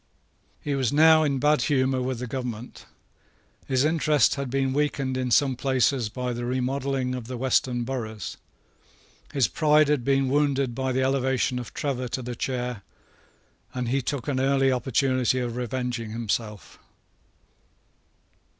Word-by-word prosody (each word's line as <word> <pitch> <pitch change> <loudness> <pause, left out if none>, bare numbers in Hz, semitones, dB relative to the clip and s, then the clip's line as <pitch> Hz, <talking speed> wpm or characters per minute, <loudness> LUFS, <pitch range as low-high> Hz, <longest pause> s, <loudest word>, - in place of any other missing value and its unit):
He 145 - -2
was 135 -3 0
now 160 +2 +6
in 145 -3 +1
bad 150 +3 +3
humour 130 -2 +1
with 130 0 -2
the 125 - -4
government. 125 -1 -6 0.8
His 130 +1 +2
interest 155 -4 +3
had 140 -2 -4
been 135 0 0
weakened 140 -2 -1
in 130 -1 -1
some 135 +1 +3
places 130 -2 +1
by 125 +1 -3
the 120 0 -5
remodelling 130 +1 -1
of 125 -3 -6
the 125 0 -5
western 125 -1 +1
boroughs: 110 -5 -5 1.0
his 135 -6 +2
pride 150 +3 +3
had 150 -5 +1
been 135 +1 +2
wounded 140 -2 +1
by 130 +2 -2
the 130 +1 +1
elevation 130 -1 +1
of 120 - -8
Trevor 130 -3 -2
to 130 +2 -4
the 120 0 -5
chair; 125 -3 -3 0.9
and 125 -2 -2
he 135 +2 +1
took 130 -1 -4
an 135 -3 0
early 135 0 +3
opportunity 130 0 +1
of 120 -2 -2
revenging 125 -2 -3
himself. 110 -5 -4
130 Hz, 150 wpm, -25 LUFS, 125-135 Hz, 1.0 s, now